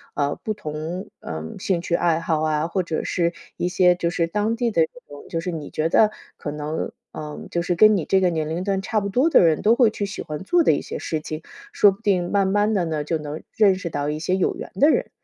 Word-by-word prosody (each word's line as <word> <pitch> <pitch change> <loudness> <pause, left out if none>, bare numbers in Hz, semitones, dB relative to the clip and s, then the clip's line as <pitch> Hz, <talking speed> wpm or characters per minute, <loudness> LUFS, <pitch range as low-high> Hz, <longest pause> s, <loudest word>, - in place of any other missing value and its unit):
呃， 145 0 0
不 215 - 0
同， 160 -1 -5
呃， 80 -1 -6 0.2
兴 180 -3 0
趣 170 - -4
爱 165 -1 +2
好 160 -2 0
啊， 155 0 0
或 185 +2 0
者 165 -2 -3
是 170 -1 0 0.2
一 175 - 0
些 180 0 +4
就 170 -1 -1
是 170 -1 0
当 210 +5 0
地 235 -1 0
的 165 - +2
这 160 - -1 0.2
种 145 0 -11
就 165 - -2
是 180 - -3
你 155 -4 -6
觉 155 +1 -1
得 215 +5 +4 0.3
可 145 - -5
能， 150 +1 -4 0.2
呃， 150 -1 -7
就 170 - 0
是 175 0 -1
跟 215 +3 +6
你 165 - -2
这 190 - +3
个 180 - +4
年 160 -2 -2
龄 170 +3 -2
段 195 -1 0
差 215 +2 0
不 200 - -3
多 255 +11 +3
的 - - +6
人 160 -2 +3
都 225 +2 +4
会 240 -3 +5
去 205 -1 -3
喜 200 - -6
欢 150 +2 -6
做 350 - +3
的 - - +5
一 - - 0
些 470 +1 -6
事 160 - -2
情， 155 +1 -6 0.3
说 205 - +6
不 195 - -11
定 185 -5 +1
慢 200 -1 +2
慢 205 +2 +2
地 180 -4 +1
呢， 155 -2 -2
就 160 +2 -1
能 150 0 -7
认 200 -3 +4
识 185 -2 -5
到 145 -2 -2
一 150 - -3
些 185 +4 0
有 185 - +1
缘 - - -8
的 285 +11 +5
人。 - - +1
175 Hz, 285 characters per minute, -23 LUFS, 155-200 Hz, 0.3 s, 跟